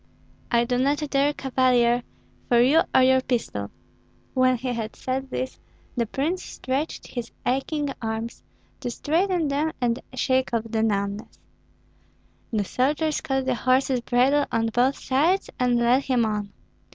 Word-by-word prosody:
"I 235 0 +3
do 245 0 0
not 285 +3 +1
care, 280 +1 +3
Cavalier, 250 -3 +2 0.5
for 240 -2 +5
you 275 +7 +5
or 260 - +7
your 260 0 +5
pistol." 225 - -2 0.6
When 255 -1 +3
he 255 +2 -4
had 230 -3 -3
said 265 +1 -3
this, 260 0 -4 0.4
the 235 -2 0
prince 310 - -2
stretched 270 +5 -3
his 240 -2 -6
aching 275 +3 -1
arms, 225 +1 -4 0.4
to 250 - -3
straighten 335 +6 0
them 295 +3 0
and 240 -1 0 0.2
shake 260 -1 +1
off 225 - 0
the 220 -1 -1
numbness. 200 -1 -2 1.1
The 210 -3 0
soldiers 295 - 0
caught 270 -1 -1
the 260 - +1
horse's 255 +1 +2
bridle 260 +5 +2
on 225 0 +1
both 255 +3 +2
sides, 320 +9 +1
and 250 -1 +3
led 245 +3 +3
him 250 -4 +2
on. 210 -2 -2
255 Hz, 150 wpm, -25 LUFS, 235-275 Hz, 1.1 s, or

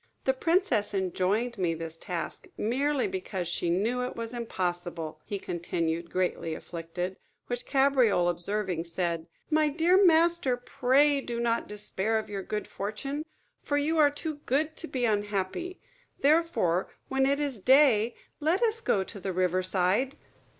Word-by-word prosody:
The 265 - +3
princess 325 - +1
enjoined 195 +5 0
me 170 -3 +1
this 165 0 -6
task, 175 -2 -5
merely 275 - +1
because 295 - -4
she 170 0 -1
knew 220 +8 +1
it 250 - -3
was 230 0 -5
impossible," 175 -8 -3
he 205 - -3
continued, 170 -2 -2
greatly 180 -3 -1
afflicted; 175 +3 -5 0.3
which 245 0 -4
Cabriole 265 -10 +3
observing, 175 0 -1
said, 170 -1 -2 0.2
"My 310 0 +4
dear 340 +6 +4
master, 335 -6 +4
pray 275 +3 +3
do 235 -3 -4
not 235 -1 0
despair 210 +1 -1
of 215 -1 -4
your 200 -1 -3
good 210 +2 -3
fortune; 275 +9 -4 0.4
for 290 - 0
you 310 +3 +1
are 295 -1 +7
too 295 +1 -5
good 305 +4 +1
to 330 - -4
be 255 -5 -1
unhappy. 210 - -1 0.4
Therefore, 290 - +2 0.2
when 270 0 +2
it 280 +1 +2
is 280 -6 -2
day, 245 -2 +5 0.2
let 330 +8 +2
us 455 0 +2
go 200 - +2
to 200 +2 -9
the 190 0 -3
river 185 0 +1
side." 190 +8 +1
225 Hz, 150 wpm, -28 LUFS, 185-285 Hz, 0.4 s, are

